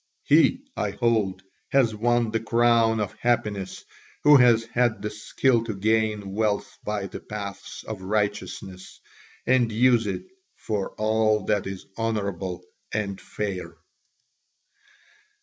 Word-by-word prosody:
He, 165 Hz, -, +4 dB
I 105 Hz, -, -1 dB
hold, 105 Hz, -3 st, 0 dB, 0.3 s
has 130 Hz, -5 st, +3 dB
won 120 Hz, +1 st, +1 dB
the 115 Hz, -, 0 dB
crown 115 Hz, 0 st, +3 dB
of 105 Hz, -3 st, -2 dB
happiness 105 Hz, -5 st, -1 dB, 0.4 s
who 150 Hz, 0 st, +8 dB
has 120 Hz, -3 st, +5 dB
had 115 Hz, -3 st, 0 dB
the 105 Hz, -, -2 dB
skill 115 Hz, +3 st, +1 dB
to 110 Hz, -3 st, -4 dB
gain 105 Hz, -1 st, 0 dB
wealth 105 Hz, 0 st, -1 dB
by 105 Hz, -2 st, -2 dB
the 95 Hz, -, -7 dB
paths 100 Hz, -2 st, -7 dB
of 110 Hz, -4 st, -7 dB
righteousness 100 Hz, -2 st, -3 dB, 0.5 s
and 125 Hz, -3 st, +3 dB
use 120 Hz, 0 st, +3 dB
it 95 Hz, -, -3 dB, 0.3 s
for 105 Hz, -3 st, -3 dB
all 110 Hz, -1 st, +1 dB
that 105 Hz, -2 st, 0 dB
is 95 Hz, -1 st, -7 dB
honourable 100 Hz, -5 st, -2 dB, 0.3 s
and 100 Hz, -3 st, -3 dB
fair." 100 Hz, -1 st, -5 dB
110 Hz, 125 wpm, -25 LUFS, 100-115 Hz, 0.5 s, who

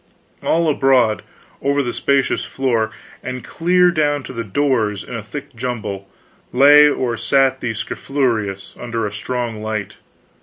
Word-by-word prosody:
All 165 Hz, 0 st, +1 dB
abroad 130 Hz, -7 st, +3 dB, 0.4 s
over 140 Hz, 0 st, +1 dB
the 120 Hz, -, -3 dB
spacious 140 Hz, -1 st, +1 dB
floor, 120 Hz, -5 st, 0 dB, 0.3 s
and 130 Hz, -1 st, -5 dB
clear 180 Hz, +1 st, +3 dB
down 145 Hz, -4 st, +1 dB
to 130 Hz, -, -8 dB
the 115 Hz, -1 st, -3 dB
doors, 110 Hz, -3 st, 0 dB
in -, -, -10 dB
a 115 Hz, -, -4 dB
thick 140 Hz, +5 st, -8 dB
jumble, 105 Hz, -5 st, -4 dB, 0.4 s
lay 145 Hz, +3 st, +7 dB
or 125 Hz, -4 st, -1 dB
sat 135 Hz, +1 st, +2 dB
the 115 Hz, -2 st, -2 dB
scrofulous, 110 Hz, -6 st, -2 dB
under 115 Hz, -2 st, -3 dB
a 105 Hz, -, -3 dB
strong 115 Hz, +1 st, -4 dB
light. 110 Hz, -2 st, -4 dB
125 Hz, 145 wpm, -19 LUFS, 110-140 Hz, 0.4 s, lay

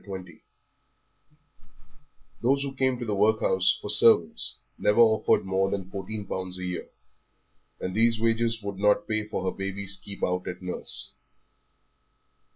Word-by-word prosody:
XX 95 Hz, -5 st, -9 dB, 2.0 s
Those 135 Hz, +3 st, +2 dB
who 140 Hz, -1 st, -4 dB
came 130 Hz, -1 st, +1 dB
to 120 Hz, -, -5 dB
the 105 Hz, -, -2 dB
workhouse 100 Hz, -2 st, +2 dB
for 105 Hz, -, -4 dB
servants 105 Hz, -6 st, +3 dB, 0.2 s
never 105 Hz, +3 st, +2 dB
offered 110 Hz, -3 st, +4 dB
more 95 Hz, 0 st, +1 dB
than 95 Hz, -1 st, -4 dB
fourteen 100 Hz, +2 st, -5 dB
pounds 95 Hz, -1 st, -5 dB
a 90 Hz, -, -7 dB
year, 90 Hz, -1 st, -5 dB, 0.9 s
and 90 Hz, -, -4 dB
these 115 Hz, +1 st, +3 dB
wages 115 Hz, 0 st, 0 dB
would 100 Hz, -1 st, -5 dB
not 105 Hz, 0 st, +3 dB
pay 110 Hz, -1 st, -1 dB
for 100 Hz, -, -4 dB
her 95 Hz, -, -2 dB
baby's 100 Hz, 0 st, -4 dB
keep 100 Hz, +1 st, -9 dB
out 90 Hz, 0 st, -1 dB
at 90 Hz, 0 st, -5 dB
nurse. 90 Hz, -1 st, +2 dB
100 Hz, 145 wpm, -27 LUFS, 95-110 Hz, 2.0 s, offered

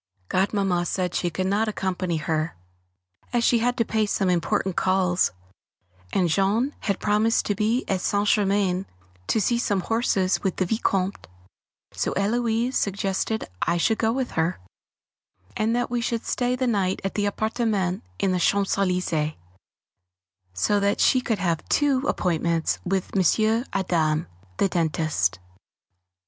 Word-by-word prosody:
Godmamma 190 Hz, -2 st, +1 dB
said 180 Hz, -1 st, -1 dB
she 175 Hz, -, 0 dB
could 185 Hz, +2 st, -2 dB
not 200 Hz, +4 st, +1 dB
possibly 215 Hz, -, -2 dB
accompany 185 Hz, -3 st, -1 dB
her, 155 Hz, +1 st, -2 dB, 0.8 s
as 240 Hz, -1 st, +2 dB
she 240 Hz, -1 st, +4 dB
had 245 Hz, +2 st, 0 dB
to 230 Hz, -, +2 dB
pay 215 Hz, -1 st, 0 dB
some 195 Hz, -2 st, +1 dB
important 190 Hz, +1 st, 0 dB
calls; 185 Hz, -1 st, +2 dB, 0.8 s
and 185 Hz, -2 st, +2 dB
Jean 200 Hz, -, +1 dB
had 200 Hz, -2 st, -2 dB
promised 215 Hz, +2 st, +2 dB
to 205 Hz, -, +1 dB
be 220 Hz, +5 st, 0 dB
at 190 Hz, -2 st, 0 dB
St. 205 Hz, +2 st, 0 dB
Germain 195 Hz, -2 st, +2 dB, 0.4 s
to -, -, +2 dB
see 235 Hz, +4 st, +1 dB
some 205 Hz, -5 st, 0 dB
horses 195 Hz, -3 st, +1 dB
with 190 Hz, -3 st, -1 dB
the 185 Hz, -, 0 dB
Vicomte, 195 Hz, -1 st, -1 dB, 0.7 s
so -, -, -1 dB
Héloise 230 Hz, +4 st, 0 dB
suggested 200 Hz, +1 st, -1 dB, 0.2 s
I 170 Hz, -, +1 dB
should 220 Hz, +6 st, +1 dB
go 225 Hz, 0 st, +2 dB
with 260 Hz, +1 st, -2 dB
her; 165 Hz, -, 0 dB, 1.0 s
and 225 Hz, +2 st, +1 dB
that 245 Hz, 0 st, -1 dB
we 240 Hz, -1 st, 0 dB
should 230 Hz, 0 st, -2 dB
stay 250 Hz, 0 st, 0 dB
the 255 Hz, 0 st, -1 dB
night 195 Hz, -6 st, 0 dB
at 195 Hz, -, -2 dB
the 205 Hz, -1 st, 0 dB
appartement 215 Hz, -4 st, -1 dB
in 195 Hz, -, +1 dB
the 180 Hz, -, +1 dB
Champs 200 Hz, +3 st, +2 dB
Elysées, 180 Hz, -5 st, 0 dB, 1.2 s
so 90 Hz, -, +1 dB
that 200 Hz, 0 st, +1 dB
she 255 Hz, -, +4 dB
could 225 Hz, -3 st, -1 dB
have 170 Hz, -5 st, -2 dB
two 285 Hz, -3 st, +3 dB
appointments 170 Hz, -, 0 dB
with 190 Hz, +1 st, -2 dB
M. 220 Hz, -, +2 dB
Adam, 165 Hz, -4 st, +1 dB, 0.3 s
the -, -, +3 dB
dentist. 155 Hz, -, 0 dB
195 Hz, 150 wpm, -24 LUFS, 180-220 Hz, 1.2 s, she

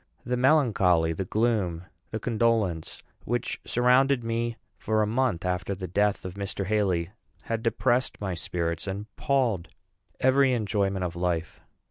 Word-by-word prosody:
The 125 Hz, +1 st, 0 dB
melancholy, 110 Hz, -, +3 dB
the 95 Hz, +4 st, -3 dB
gloom, 105 Hz, -6 st, 0 dB, 0.3 s
the 110 Hz, -, -3 dB
condolence 110 Hz, -7 st, 0 dB, 0.2 s
which 120 Hz, +1 st, -2 dB
surrounded 125 Hz, +1 st, +3 dB
me 115 Hz, 0 st, -2 dB, 0.2 s
for 110 Hz, 0 st, +1 dB
a -, -, +2 dB
month 115 Hz, -5 st, 0 dB
after 90 Hz, +2 st, -1 dB
the 95 Hz, 0 st, -6 dB
death 100 Hz, +3 st, +1 dB
of 90 Hz, -, -5 dB
Mr. 100 Hz, 0 st, -4 dB
Haly 95 Hz, -4 st, 0 dB, 0.3 s
had 115 Hz, -1 st, -2 dB
depressed 120 Hz, +2 st, +1 dB
my 95 Hz, -3 st, -2 dB
spirits, 85 Hz, 0 st, -3 dB
and 100 Hz, +2 st, -4 dB
palled 120 Hz, -11 st, +1 dB, 0.5 s
every 130 Hz, 0 st, +4 dB
enjoyment 100 Hz, -4 st, 0 dB
of 85 Hz, -1 st, -4 dB
life. 85 Hz, -2 st, -2 dB
105 Hz, 140 wpm, -27 LUFS, 90-120 Hz, 0.5 s, every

